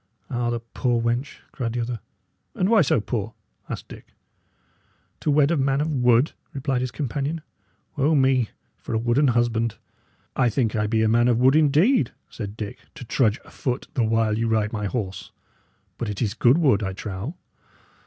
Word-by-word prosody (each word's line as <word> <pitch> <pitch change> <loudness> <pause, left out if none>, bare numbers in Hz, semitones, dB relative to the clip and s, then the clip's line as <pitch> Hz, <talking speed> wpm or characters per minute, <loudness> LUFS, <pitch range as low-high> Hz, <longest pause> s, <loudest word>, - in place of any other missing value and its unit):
"Ah, 120 -1 0
the 120 0 -1
poor 120 +1 -1
wench!" 120 +4 -2
cried 115 -4 -3
the 120 - -2
other. 115 0 -3 0.6
"And 185 - +1
why 225 -2 +6
so 155 -6 +3
poor?" 110 0 -3 0.3
asked - - -5
Dick. - - -13 1.0
"To - - -2
wed 145 +1 +4
a 170 - +2
man 135 0 +1
of 155 +1 0
wood," 125 +1 +3 0.2
replied 135 -2 -1
his 130 - -1
companion. 145 +4 -3 0.6
"O 150 +4 +3
me, 130 -4 +3 0.3
for - - -5
a - - +3
wooden 120 +6 +2
husband!" 115 -2 +1 0.6
"I 125 -2 +3
think 115 -2 0
I 105 -1 +1
be 110 0 +2
a - - +3
man 120 +2 +4
of 120 -2 +3
wood, 130 +3 +5
indeed," 155 - +4 0.2
said 105 -1 -6
Dick, 105 -2 -6 0.2
"to 125 - -9
trudge 110 -1 +1
afoot 125 -1 -4
the 125 - +1
while 110 -1 +1
you 115 - +1
ride 110 -1 +1
my 105 -2 -2
horse; 100 -4 -4 0.7
but 115 - -2
it 105 - -4
is 110 -4 0
good 125 +4 +4
wood, 135 -11 +3
I 95 -2 -2
trow." 100 - -5
120 Hz, 185 wpm, -24 LUFS, 110-135 Hz, 1.0 s, why